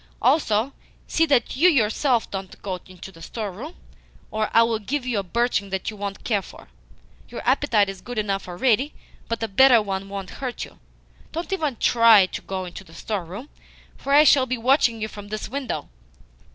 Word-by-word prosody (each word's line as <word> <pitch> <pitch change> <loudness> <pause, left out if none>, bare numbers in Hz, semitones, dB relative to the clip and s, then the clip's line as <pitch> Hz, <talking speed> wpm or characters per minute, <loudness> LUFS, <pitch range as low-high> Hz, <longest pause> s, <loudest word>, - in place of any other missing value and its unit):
Also, 245 -3 +2 0.3
see 325 0 +1
that 270 -6 +2
you 335 +7 +5
yourself 245 -2 +2
don't 195 -1 -6
go 185 -2 -3
into 185 +1 -11
the 165 -3 -16
storeroom, 225 - -6 0.6
or 215 0 -1
I 230 - +6
will 230 -1 0
give 255 +5 -3
you 240 -5 0
a - - -3
birching 215 0 0
that 190 +3 -3
you - - -10
won't 200 -1 -6
care 210 -4 +1
for. 175 - -14 0.6
Your - - -7
appetite 245 -6 +3
is 195 -1 -7
good 245 -1 -8
enough 200 -3 -1
already, 245 +9 +1 0.3
but 230 0 -2
a - - 0
better 245 +4 +6
one 195 -2 -4
won't 195 -2 -6
hurt 255 -2 -4
you. - - -18 0.5
Don't 335 +4 -3
even 305 -9 -1
TRY 230 -3 +6
to - - -7
go 190 -1 -4
into 180 +2 -9
the 165 -3 -17
storeroom, 205 - -5 0.5
for 275 - -5
I 290 +2 +8
shall 275 -4 +5
be 255 0 -1
watching 235 -1 +3
you 215 - -2
from 205 -1 -10
this 215 +1 -5
window." 270 +1 -4
220 Hz, 190 wpm, -23 LUFS, 195-260 Hz, 0.6 s, I